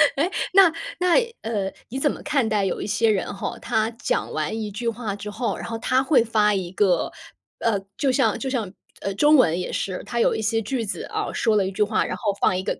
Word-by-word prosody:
哎， 310 +6 +1 0.2
那 380 -3 +7 0.3
那 360 -1 +3 0.3
呃， 205 -4 -2 0.2
你 260 +3 -4
怎 295 - +2
么 - - -8
看 285 -6 +1
待 210 -2 +1
有 190 - -2
一 - - -4
些 220 +2 +2
人 195 -2 -1
吼， 195 - -4
他 220 0 0
讲 - - -1
完 220 - -2
一 215 -2 -4
句 230 +4 -4
话 220 -3 -4
之 205 +1 -7
后， 230 +3 -2
然 - - -6
后 230 - -3
他 255 +3 +2
会 265 -3 +4
发 215 -2 +2
一 185 -3 -2
个， 190 -1 +2 0.5
呃 220 -3 +1 0.2
就 275 - +2
像 265 +1 +2
就 270 - -3
像， 230 -8 -2 0.3
呃 200 - -2
中 295 +8 +5
文 175 - +4
也 180 - -4
是， 185 -2 -3
他 235 - -3
有 - - +3
一 - - -2
些 225 +1 +1
句 230 +2 -2
子 205 - -4
啊， - - -3
说 220 -2 +2
了 200 -2 +3
一 - - -3
句 195 - +1
话， 215 +1 +1
然 - - -3
后 205 -4 0
放 180 - +3
一 185 - -3
个 - - -2
220 Hz, 265 characters per minute, -23 LUFS, 200-255 Hz, 0.5 s, 那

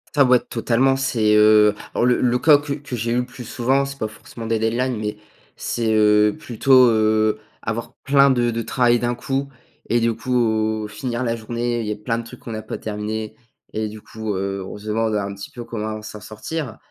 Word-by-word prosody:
Ça, 140 -2 +6
ouais, 125 -1 +5
totalement. 125 +4 +1
C'est, 115 -5 +2
heu, 105 0 +6 0.2
alors - - +1
le 125 0 +3
le 125 0 +2
cas 150 +2 +7
que 145 0 -4
que 140 -3 -6
j'ai 115 0 -2
eu 120 - +1
le 125 - 0
plus 125 0 -10
souvent, 130 +4 +1
c'est 140 0 -8
pas 110 - -1
forcément 110 +1 -10
des 115 0 +1
deadlines, 120 +3 0
mais 105 0 -3 0.4
c'est, 115 -2 -1
heu, 105 -1 +4
plutôt, 130 +1 +4
heu, 110 -1 +2 0.2
avoir 115 +1 -4
plein 140 0 +5
de 120 -2 +2
de 115 0 -2
travail 120 0 +2
d'un 120 0 -1
coup 135 +2 -2 0.4
et 120 - +3
du 115 -1 +1
coup, 110 -3 0
finir 120 +3 -3
la 115 -2 0
journée, 120 +1 -2
il 110 - -4
y - - -1
a - - -2
plein 110 +2 -2
de 115 - -4
trucs 120 +2 -12
qu'on 115 - -7
a 110 - -4
pas 110 - -6
terminé 110 0 -4 0.4
et 110 0 -1
du 105 0 -10
coup, 110 -1 -5
heu, 95 0 -3
on 95 - -8
se 105 +1 -11
demande 110 0 0
un 100 -1 -2
petit 100 - -9
peu 120 - -7
comment 110 -1 -4
s'en 105 0 -9
sortir. 115 +5 -5
115 Hz, 220 wpm, -21 LUFS, 110-125 Hz, 0.4 s, cas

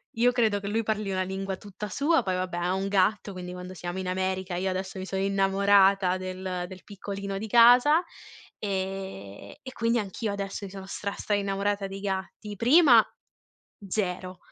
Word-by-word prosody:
io 240 +2 +4
credo 220 -4 +2
che 200 - -6
lui 220 +3 0
parli 215 -2 -2
una 185 -1 0
lingua 190 +1 -4
tutta 205 +1 -8
sua, 285 - +2
poi 185 -5 -1
vabbè 185 -1 -3
ha 175 +1 0
un 190 +1 -1
gatto, 200 +1 +1
quindi 180 -1 -7
quando 180 0 -8
siamo 175 0 -6
in 190 - -3
America 185 0 -2
io 190 +2 -1
adesso 190 +1 -4
mi 185 - -5
sono 190 0 -2
innamorata 195 -1 +3
del 185 -1 -4
del 185 0 -11
piccolino 200 -1 -6
di 220 - -5
casa, 245 - +6 0.6
ehm, 190 - -5
e 260 - -8
quindi 230 -1 +1
anch'io 210 +1 -3
adesso 200 0 -5
mi - - -8
sono 195 -1 -8
stra, 200 +1 -4
stra 210 - -3
innamorata 200 0 -1
dei 195 0 -7
gatti. 200 +1 -4
Prima 250 - +7 0.8
0, 185 -2 -3
195 Hz, 180 wpm, -27 LUFS, 185-210 Hz, 0.8 s, Prima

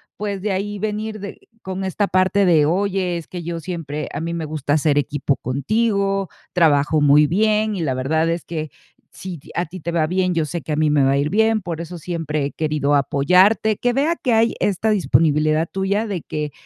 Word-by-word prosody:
pues 200 -2 -4
de 205 0 -1
ahí 205 +2 -3
venir 215 +1 -3
de 200 0 -8 0.2
con 190 0 -5
esta 190 +2 -1
parte 190 +2 +2
de: 160 -5 +4
"Oye, 185 0 0
es 165 - -8
que 180 - -7
yo 170 0 -4
siempre 160 -4 -5
a - - -4
mí 165 +1 -3
me 165 -2 -3
gusta 150 -2 -4
hacer 150 -1 +2
equipo 145 -1 0
contigo, 195 - 0 0.2
trabajo 155 -3 +3
muy 145 +1 +6
bien, 215 +4 +1
y 185 - -3
la 135 -5 -1
verdad 160 +6 0
es 170 0 -2
que 155 -2 -4 0.4
si 185 -2 -7
ti - - -18
a 175 - 0
ti 180 +3 -10
te 170 - -3
va 165 -2 +1
bien, 185 +1 0
yo 165 -2 0
sé 170 +3 -4
que 155 - -7
a - - +1
mí 155 0 +2
me 145 -2 +3
va 135 - +3
a - - +2
ir 140 +2 0
bien, 220 +2 +2
por 170 -3 -5
eso 170 +1 -7
siempre 155 -3 -3
he 140 - -3
querido 150 -2 0
apoyarte". 180 +10 +3
Que 245 - +1
vea 295 +6 +1
que 255 - -2
hay 225 +1 +3
esta 205 +2 +1
disponibilidad 155 -3 +2
tuya 195 +3 -1
de 195 -5 -3
que, 150 -1 -4
170 Hz, 220 wpm, -20 LUFS, 150-200 Hz, 0.4 s, muy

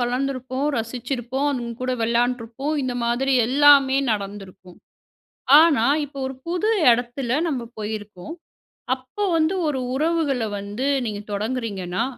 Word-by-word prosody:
வளர்ந்துருப்போம், 260 +2 -2
ரசிச்சிருப்போம். 245 +3 -3
அவுங்ககூட 245 0 -3
விளையாண்டுருப்போம். 240 +4 -1
இந்த 255 -1 -2
மாதிரி 245 +3 0
எல்லாமே 275 0 +5
நடந்திருக்கும். 195 -3 -6 0.8
ஆனா, 315 -8 +4 0.2
இப்போ 280 -1 -11
ஒரு 265 - -5
புது 360 +5 0 0.2
இடத்தில 245 +1 0 0.2
நம்ம 255 -6 -3
போயிருக்கோம். 210 - -6 0.6
அப்போ 260 +10 -7
வந்து 320 +4 +1
ஒரு 285 -3 -1 0.2
உறவுகள 305 -4 0
வந்து 205 +6 -4 0.2
நீங்க 210 -1 -4
தொடங்குறீங்கன்னா, 205 -4 -2
250 Hz, 110 wpm, -22 LUFS, 225-275 Hz, 0.8 s, எல்லாமே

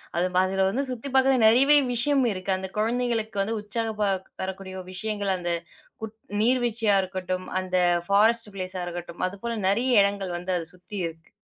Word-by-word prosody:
அது 175 +2 +2 0.2
அதுல 190 0 +1
வந்து 255 +8 -1
சுத்தி 250 +1 -5
பாக்கறதுக்கு 265 -3 +4
நிறையவே 270 +6 +6 0.2
விஷயம் 270 +3 +2
இருக்கு. 185 0 -3
அந்த 190 0 -5
குழந்தைகளுக்கு 225 -2 0
வந்து 220 +3 -1
உற்சாகம் 220 +1 -3
ப - - +4 0.4
தரக்கூடிய 190 0 -5 0.2
விஷயங்கள், 205 0 -2
அந்த 175 -1 -3 0.9
நீர்வீழ்ச்சியா 235 -4 +2
இருக்கட்டும், 185 -1 -4
அந்த 185 0 -3 0.3
ஃபாரஸ்ட் 220 +2 +3
பிளேஸ 185 0 -5
இருக்கட்டும். 175 -1 -7
அது 185 - -7
போல 235 - -2
நிறைய 235 +7 +2
இடங்கள் 200 -3 -2
வந்து 180 +2 -4
அதை 165 - -4
சுத்தி 180 +4 -10
இருக்கு. 165 0 -12
205 Hz, 155 wpm, -26 LUFS, 185-235 Hz, 0.9 s, நிறையவே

